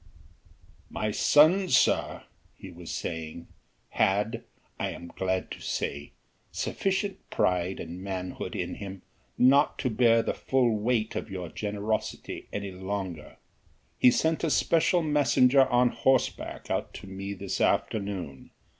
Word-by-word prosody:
"My 110 0 -2
son, 165 - +5
sir," - - +2 0.3
he 95 - -10
was 85 -1 -10
saying, 80 0 -5 0.4
"had, 105 +3 +1 0.4
I - - -1
am 85 - -8
glad 95 +1 -2
to - - -6
say, 70 +1 -3 0.4
sufficient 195 +1 -2
pride 90 +1 0
and 85 +3 -7
manhood 95 -2 -5
in - - -3
him 95 -2 -8 0.3
not 140 +4 +4
to 130 - -1
bear 115 0 +4
the - - -1
full 125 -4 +1
weight 110 0 0
of 110 - -4
your 90 -3 -5
generosity 105 +1 -3
any 100 -1 -4
longer. 95 -3 -5 0.6
He - - +7
sent 160 +7 +1
a 165 - +2
special 165 +3 +2
messenger 140 -3 +4
on 125 0 +3
horseback 130 0 0
out - - -2
to - - -9
me 95 +1 -6
this 95 0 -4
afternoon. 100 -10 -1
105 Hz, 130 wpm, -28 LUFS, 95-130 Hz, 0.6 s, He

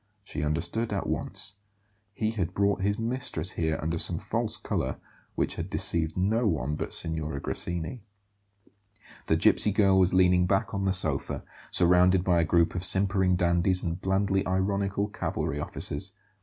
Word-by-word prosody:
She 100 - -5
understood 85 +10 -1
at 100 -2 -2
once; - - -3 0.6
he 110 0 -1
had 90 -5 -3
brought 100 0 +1
his 100 +1 0
mistress 115 -8 -3
here 80 -1 -1
under 80 +1 -2
some - - +1
false - - -2
colour, - - -3 0.4
which - - 0
had - - -4
deceived 80 -1 -1
no 110 +5 +1
one 75 -6 -1
but - - -4
Signora 80 -3 -2
Grassini. 85 - -4 1.3
The - - +3
gipsy 105 - +3
girl 95 -2 +4
was 95 -1 +4
leaning 90 -1 +4
back 95 +1 0
on 100 0 -1
the 95 - +2
sofa, 80 -7 +1 0.3
surrounded 90 +1 +4
by 90 -2 +2
a - - +1
group 85 +1 +2
of 90 - -3
simpering 95 -1 +4
dandies 90 +1 +2
and 85 +1 -3
blandly 95 0 +1
ironical 100 +2 0
cavalry 75 -7 -3
officers. 75 +5 -2
95 Hz, 155 wpm, -27 LUFS, 85-100 Hz, 1.3 s, girl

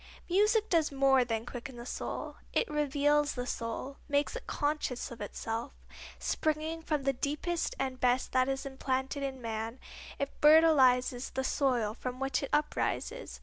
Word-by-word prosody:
Music 420 +4 +3
does 325 -6 +2
more 270 -1 +4
than 225 -2 -2
quicken 245 +1 -7
the 235 - -8
soul; - - -5 0.2
it - - +2
reveals 295 -1 +2
the 245 -1 -3
soul, 245 +3 -4
makes 285 +8 +1
it - - -7
conscious 290 -5 -1
of 235 - -9
itself. 225 +3 -4 0.4
Springing 315 +1 -1
from 300 -3 -1
the 275 0 +2
deepest 300 +6 -2
and 260 -1 -2
best 250 +1 +2
that 255 +1 +3
is 270 0 -2
implanted 265 +1 -2
in 270 -1 -3
man, 225 +1 -4 0.4
it 280 - -2
fertilizes 270 -5 +5
the 265 - -2
soil 250 -6 +1
from 250 +2 -5
which 270 0 0
it 275 - -4
uprises. 305 +10 -1
270 Hz, 155 wpm, -31 LUFS, 250-300 Hz, 0.4 s, fertilizes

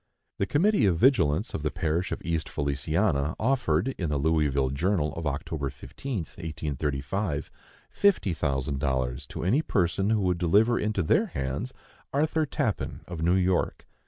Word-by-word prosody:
The 100 - +1
committee 160 - +3
of 85 -4 +2
vigilance 100 - +3
of - - -3
the 75 - 0
parish 85 +5 -1
of - - -4
East 80 -1 -1
Feliciana 75 +2 0
offered, 110 - +1
in 85 -4 -1
the 75 - 0
Louisville 70 -3 +1
Journal 80 +2 0
of 80 - -5
Oct. 70 0 -2
15, 135 -4 -6
1835, 75 +1 -3 0.4
fifty 195 - +2
thousand 70 -2 -1
dollars 65 0 -1
to - - -6
any 115 - +3
person 95 - +1
who 110 -1 +2
would 90 -2 +1
deliver 105 +7 +4
into 105 -3 0
their - - +3
hands 70 - -3 0.4
Arthur 155 +2 +1
Tappan, 130 -7 -2
of 90 -3 -6
New 85 +3 +3
York. 95 -1 +1
85 Hz, 155 wpm, -27 LUFS, 75-105 Hz, 0.4 s, deliver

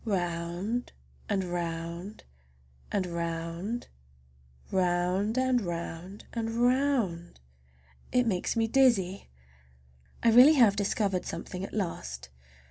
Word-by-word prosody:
Round 180 +3 -2 0.4
and 195 -2 +1
round 170 +2 -4 0.7
and 195 -2 0
round—round 170 +5 -4 1.5
and 255 -1 +2
round 175 +2 -6
and 225 -1 -2
round—it 175 - -1
makes 190 -2 0
me 225 -1 +2
dizzy! 220 -7 +2 0.9
I 230 - +5
really 250 +7 +9
have 230 -7 +6
discovered 200 -2 0
something 180 +2 -5
at 195 - -6
last. 65 - -4
190 Hz, 90 wpm, -29 LUFS, 170-230 Hz, 1.5 s, really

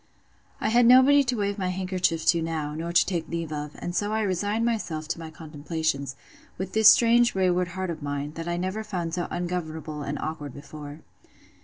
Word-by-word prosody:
I - - 0
had 235 +1 +5
nobody 260 +3 +7
to 250 0 0
wave 200 0 -1
my 185 - -1
handkerchief 185 -3 -1
to 170 -1 +4
now, 160 -2 -3
nor 165 +2 -4
to 175 - +4
take 170 -4 -3
leave 165 -2 -3
of; 150 0 -5
and 175 - -5
so 205 +3 0
I 220 0 0
resigned 205 +4 0
myself 170 -10 -2
to 170 - -2
my 165 -1 -7
contemplations, 155 -3 -3 0.4
with 190 +1 -5
this 220 -1 +8
strange 240 0 +5
wayward 180 -1 +2
heart 185 -2 -2
of 160 -1 -7
mine, 145 0 -3
that 165 +1 -6
I 175 0 -1
never 190 +5 -2
found 180 -6 -4
so 175 0 -2
ungovernable 160 -4 -4
and 145 +1 -3
awkward 150 -3 -5
before. 145 +1 -9
170 Hz, 195 wpm, -26 LUFS, 155-195 Hz, 0.4 s, this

